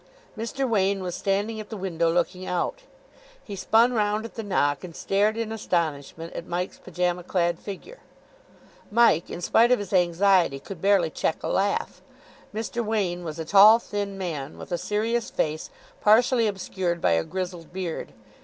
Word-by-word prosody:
Mr. 245 Hz, +5 st, -2 dB
Wain 200 Hz, -3 st, +1 dB
was 180 Hz, -1 st, -3 dB
standing 205 Hz, +4 st, -1 dB
at 215 Hz, -, -8 dB
the 220 Hz, -, -6 dB
window, 170 Hz, -3 st, 0 dB
looking 180 Hz, +2 st, -1 dB
out. 185 Hz, -, -2 dB, 0.6 s
He 205 Hz, -, -7 dB
spun 225 Hz, +6 st, +3 dB
round 210 Hz, -1 st, 0 dB
at 230 Hz, -, -9 dB
the 225 Hz, -, -5 dB
knock, 145 Hz, -8 st, 0 dB
and 170 Hz, -3 st, -9 dB
stared 205 Hz, +3 st, +1 dB
in 225 Hz, -1 st, -3 dB
astonishment 165 Hz, -6 st, -2 dB
at 170 Hz, -, -7 dB
Mike's 180 Hz, +2 st, -3 dB
pyjama 180 Hz, 0 st, -2 dB
clad 175 Hz, -1 st, 0 dB
figure. 210 Hz, -, -9 dB, 0.9 s
Mike, 230 Hz, -7 st, +4 dB
in 175 Hz, -, -6 dB
spite 230 Hz, +7 st, +4 dB
of 250 Hz, -, +5 dB
his 205 Hz, -1 st, -6 dB
anxiety, 180 Hz, -4 st, +3 dB
could 170 Hz, +4 st, -9 dB
barely 195 Hz, -5 st, +3 dB
check 160 Hz, -, -2 dB
a -, -, -2 dB
laugh. 200 Hz, +1 st, -1 dB, 0.5 s
Mr. 225 Hz, +2 st, -3 dB
Wain 195 Hz, -5 st, -1 dB
was 155 Hz, -2 st, -6 dB
a 160 Hz, -, -4 dB
tall, 205 Hz, +5 st, +8 dB
thin 205 Hz, -3 st, -4 dB
man, 155 Hz, -7 st, -5 dB
with -, -, -10 dB
a 175 Hz, -, 0 dB
serious 225 Hz, +3 st, -1 dB
face 155 Hz, 0 st, -2 dB, 0.3 s
partially 230 Hz, +2 st, +4 dB
obscured 190 Hz, -3 st, -2 dB
by 90 Hz, -, +2 dB
a 80 Hz, 0 st, +2 dB
grizzled 180 Hz, -, -5 dB
beard. 180 Hz, -3 st, -4 dB
195 Hz, 170 wpm, -25 LUFS, 175-215 Hz, 0.9 s, tall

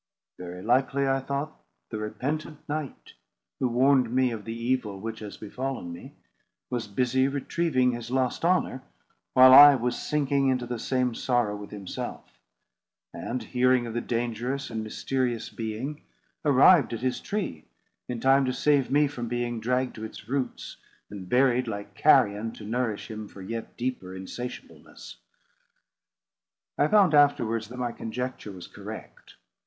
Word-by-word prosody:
"Very 90 Hz, 0 st, -7 dB
likely," 135 Hz, +3 st, +2 dB
I 135 Hz, 0 st, +2 dB
thought, 140 Hz, +3 st, -5 dB, 0.3 s
"the 110 Hz, -, -3 dB
repentant 145 Hz, +8 st, -4 dB
knight, 150 Hz, -2 st, -5 dB, 0.5 s
who 130 Hz, -, +2 dB
warned 130 Hz, +1 st, +3 dB
me 130 Hz, 0 st, +2 dB
of 110 Hz, -3 st, -6 dB
the 115 Hz, 0 st, -5 dB
evil 115 Hz, -4 st, -1 dB
which 110 Hz, +2 st, -5 dB
has 105 Hz, -2 st, -8 dB
befallen 125 Hz, -4 st, -5 dB
me, 85 Hz, -, -11 dB, 0.6 s
was 120 Hz, -3 st, -2 dB
busy 125 Hz, +5 st, +1 dB
retrieving 140 Hz, -1 st, +1 dB
his 120 Hz, -1 st, -6 dB
lost 130 Hz, +2 st, 0 dB
honour, 170 Hz, -6 st, +1 dB, 0.5 s
while 130 Hz, 0 st, +8 dB
I 145 Hz, +1 st, +11 dB
was 125 Hz, -1 st, -1 dB
sinking 140 Hz, -2 st, +1 dB
into 125 Hz, -1 st, 0 dB
the 120 Hz, -1 st, -4 dB
same 125 Hz, -1 st, 0 dB
sorrow 120 Hz, -3 st, 0 dB
with 105 Hz, 0 st, -8 dB
himself; 100 Hz, -3 st, -7 dB, 0.7 s
and, 125 Hz, +2 st, -4 dB
hearing 125 Hz, 0 st, +2 dB
of 115 Hz, -, -6 dB
the 120 Hz, -, -1 dB
dangerous 120 Hz, +4 st, -3 dB
and 110 Hz, -1 st, -3 dB
mysterious 120 Hz, +2 st, -2 dB
being, 115 Hz, +7 st, -5 dB, 0.4 s
arrived 145 Hz, 0 st, +5 dB
at 115 Hz, -, -4 dB
his 130 Hz, 0 st, -1 dB
tree 195 Hz, -, -4 dB, 0.4 s
in 120 Hz, -2 st, -4 dB
time 135 Hz, +2 st, +4 dB
to 130 Hz, -, -1 dB
save 145 Hz, -2 st, +2 dB
me 145 Hz, +2 st, +4 dB
from 125 Hz, -4 st, -4 dB
being 120 Hz, -1 st, -2 dB
dragged 125 Hz, +3 st, 0 dB
to 110 Hz, -, -7 dB
its 110 Hz, -1 st, -9 dB
roots, 135 Hz, +1 st, -3 dB, 0.3 s
and 95 Hz, -3 st, -8 dB
buried 125 Hz, -1 st, +3 dB
like 100 Hz, -2 st, -6 dB
carrion, 105 Hz, +2 st, +3 dB
to -, -, -11 dB
nourish 115 Hz, -1 st, -2 dB
him 110 Hz, -1 st, -6 dB
for 95 Hz, -, -11 dB
yet 115 Hz, +3 st, -6 dB
deeper 120 Hz, -7 st, -4 dB
insatiableness." 120 Hz, +6 st, -9 dB, 1.6 s
I -, -, +3 dB
found 200 Hz, -6 st, +5 dB
afterwards 115 Hz, -7 st, +3 dB
that 125 Hz, +3 st, -10 dB
my 125 Hz, -1 st, -2 dB
conjecture 125 Hz, -1 st, -5 dB
was 90 Hz, -2 st, -9 dB
correct. -, -, -10 dB
125 Hz, 150 wpm, -27 LUFS, 110-135 Hz, 1.6 s, I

